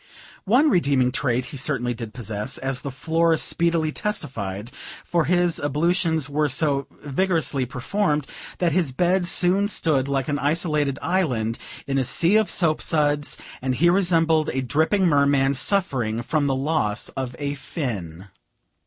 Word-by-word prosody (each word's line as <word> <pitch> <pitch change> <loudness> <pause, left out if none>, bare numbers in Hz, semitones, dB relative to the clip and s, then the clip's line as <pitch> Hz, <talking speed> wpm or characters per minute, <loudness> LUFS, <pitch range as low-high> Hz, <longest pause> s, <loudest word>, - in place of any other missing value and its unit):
One 260 +9 +4
redeeming 140 -7 +2
trait 125 -1 -1
he - - -6
certainly 125 -3 -1
did 115 -2 -7
possess, 105 -3 -4
as 135 -1 -1
the 140 - -5
floor 160 +5 +1
speedily 165 -1 +1
testified; 120 - -4 0.3
for 170 -2 0
his 175 -1 +1
ablutions 160 +1 +1
were 150 +1 0
so 140 0 0 0.2
vigorously 150 -3 +1
performed, 150 - -1 0.3
that 175 -2 +1
his 165 -4 0
bed 180 +6 +1
soon 185 +3 +3
stood 155 -9 +1
like 135 -2 -1
an 145 -1 -1
isolated 150 -2 0
island, 125 -12 -1 0.3
in 135 -1 -1
a - - +1
sea 170 - +2
of 220 -2 +1
soap 160 -4 +1
suds, 145 -2 0 0.2
and 130 0 -1
he 170 +6 +4
resembled 165 -4 +2
a 130 +1 -2
dripping 160 - +1
merman, 140 -3 +3
suffering 130 - 0
from 145 +2 0
the 135 - +1
loss 130 -6 -1
of 130 -2 -5
a 145 -1 -3
fin. 105 - -5
145 Hz, 150 wpm, -23 LUFS, 130-170 Hz, 0.3 s, One